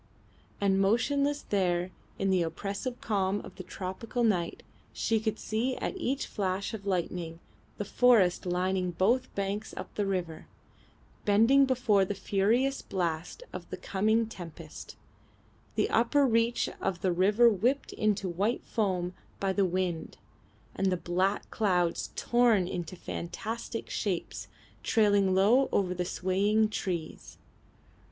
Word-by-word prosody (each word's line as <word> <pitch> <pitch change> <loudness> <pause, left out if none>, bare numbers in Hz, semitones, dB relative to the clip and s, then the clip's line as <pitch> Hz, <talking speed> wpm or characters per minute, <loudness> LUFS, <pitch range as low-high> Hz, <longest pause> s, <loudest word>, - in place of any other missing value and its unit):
And 195 -1 +2
motionless 280 +8 +1
there 180 -2 0 0.3
in 195 0 +1
the 185 -2 +3
oppressive 200 +9 -3
calm 200 -2 0
of - - -11
the 185 - -6
tropical 190 +6 -4
night 180 -7 0 0.3
she 225 -1 0
could 220 0 -2
see 235 +5 -1
at - - -3
each 275 -6 -1
flash 195 0 -2
of 200 -2 -6
lightning 175 -3 -2 0.4
the 205 - -3
forest 205 -6 +4
lining 180 +1 0
both 240 +9 +1
banks 200 +2 -3
up - - -7
the 205 -1 -1
river, 175 -5 -3 0.8
bending 230 +7 +5
before 245 -6 +3
the 200 +2 -2
furious 230 +9 +1
blast 175 - -3
of - - -7
the - - -5
coming 220 +4 +1
tempest, 165 -6 -9 0.8
the - - +2
upper 240 +5 +3
reach 230 -1 +2
of 185 -3 -2
the 185 - +2
river 205 +7 +4
whipped 235 +6 +1
into 210 -2 0
white 200 +7 -1
foam 185 -5 -1 0.3
by 195 -1 0
the 195 0 +2
wind, 180 -2 -2 0.6
and 195 - +1
the 185 -1 +1
black 185 +4 0
clouds 180 -6 +1
torn 235 -6 +3
into 175 0 -5
fantastic 220 +7 -5
shapes 190 -6 -3 0.3
trailing 205 -3 +3
low 230 +8 +4
over 185 -2 +1
the 180 0 -2
swaying 200 +4 +1
trees. 175 -6 -4
195 Hz, 135 wpm, -29 LUFS, 185-225 Hz, 0.8 s, bending